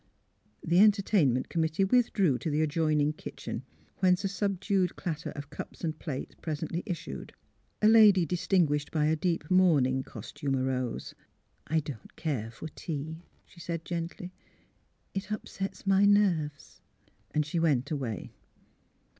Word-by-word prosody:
The 170 Hz, +2 st, +4 dB
entertainment 200 Hz, -, +4 dB
committee 160 Hz, +2 st, 0 dB
withdrew 195 Hz, -, +3 dB
to 160 Hz, -, -2 dB
the 150 Hz, +1 st, +1 dB
adjoining 155 Hz, -1 st, +1 dB
kitchen, -, -, -6 dB, 0.4 s
whence 185 Hz, +1 st, +3 dB
a -, -, +1 dB
subdued 195 Hz, -2 st, 0 dB
clatter 160 Hz, -3 st, -4 dB
of 145 Hz, -1 st, -8 dB
cups -, -, -8 dB
and 155 Hz, -2 st, -2 dB
plates 140 Hz, -5 st, -5 dB
presently 160 Hz, +2 st, -3 dB
issued. 175 Hz, -4 st, -5 dB, 0.5 s
A -, -, +7 dB
lady 210 Hz, -5 st, +7 dB
distinguished 160 Hz, -3 st, +1 dB
by 155 Hz, -2 st, +1 dB
a 155 Hz, +1 st, +3 dB
deep 165 Hz, -1 st, -1 dB
mourning 145 Hz, -8 st, +4 dB
cos -, -, -9 dB
tume 140 Hz, -2 st, -2 dB
arose. 130 Hz, -2 st, -2 dB, 0.3 s
'' -, -, -43 dB
I 160 Hz, 0 st, +2 dB
don't 140 Hz, -7 st, -9 dB
care 135 Hz, -9 st, -2 dB
for 115 Hz, +7 st, -8 dB
tea," 160 Hz, +1 st, -5 dB, 0.2 s
she 175 Hz, -, -18 dB
said, 165 Hz, -1 st, -4 dB
gently. 175 Hz, +1 st, -5 dB, 0.4 s
*' -, -, -40 dB, 0.3 s
It 195 Hz, +1 st, -4 dB
upsets 210 Hz, -3 st, -5 dB
my 195 Hz, 0 st, +5 dB
nerves." 175 Hz, -8 st, +1 dB, 0.5 s
And 150 Hz, 0 st, 0 dB
she 160 Hz, +3 st, -2 dB
went 145 Hz, -5 st, +1 dB
away. 125 Hz, -, -3 dB
160 Hz, 145 wpm, -29 LUFS, 145-190 Hz, 0.5 s, A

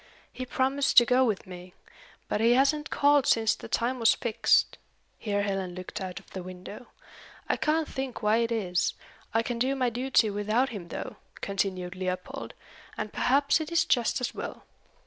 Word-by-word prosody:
"He 255 Hz, -, -6 dB
promised 270 Hz, +2 st, 0 dB
to 240 Hz, -, +10 dB
go 250 Hz, +2 st, +4 dB
with 215 Hz, -5 st, -1 dB
me. 180 Hz, -1 st, -11 dB, 0.5 s
But 210 Hz, -, -1 dB
he 230 Hz, +1 st, +5 dB
hasn't 280 Hz, +4 st, +2 dB
called 285 Hz, -1 st, +3 dB
since 220 Hz, -1 st, +3 dB
the -, -, -9 dB
time 240 Hz, +3 st, -1 dB
was 230 Hz, 0 st, +5 dB
fixed." 230 Hz, -3 st, +2 dB, 0.4 s
Here 205 Hz, -2 st, -1 dB
Helen 195 Hz, -3 st, -2 dB
looked 185 Hz, +2 st, -7 dB
out 185 Hz, 0 st, -5 dB
of 195 Hz, -, -22 dB
the 190 Hz, -, -5 dB
window. 185 Hz, +6 st, -9 dB, 0.6 s
"I -, -, +2 dB
can't 315 Hz, 0 st, 0 dB
think 265 Hz, -4 st, -5 dB
why 210 Hz, +1 st, +4 dB
it 230 Hz, 0 st, 0 dB
is. 185 Hz, -6 st, 0 dB, 0.4 s
I 225 Hz, +1 st, +2 dB
can 235 Hz, 0 st, -3 dB
do 265 Hz, +3 st, +1 dB
my 255 Hz, -3 st, 0 dB
duty 245 Hz, -2 st, +2 dB
without 215 Hz, +6 st, +1 dB
him 200 Hz, -7 st, -7 dB
though," -, -, -6 dB, 0.2 s
continued 185 Hz, -2 st, -2 dB
Leopold, 185 Hz, 0 st, -5 dB, 0.4 s
"and 215 Hz, 0 st, -4 dB
perhaps 280 Hz, +4 st, +2 dB
it 315 Hz, +1 st, -6 dB
is 335 Hz, -1 st, +3 dB
just 240 Hz, -1 st, +1 dB
as 250 Hz, -, -3 dB
well. -, -, -7 dB
230 Hz, 180 wpm, -28 LUFS, 195-260 Hz, 0.6 s, to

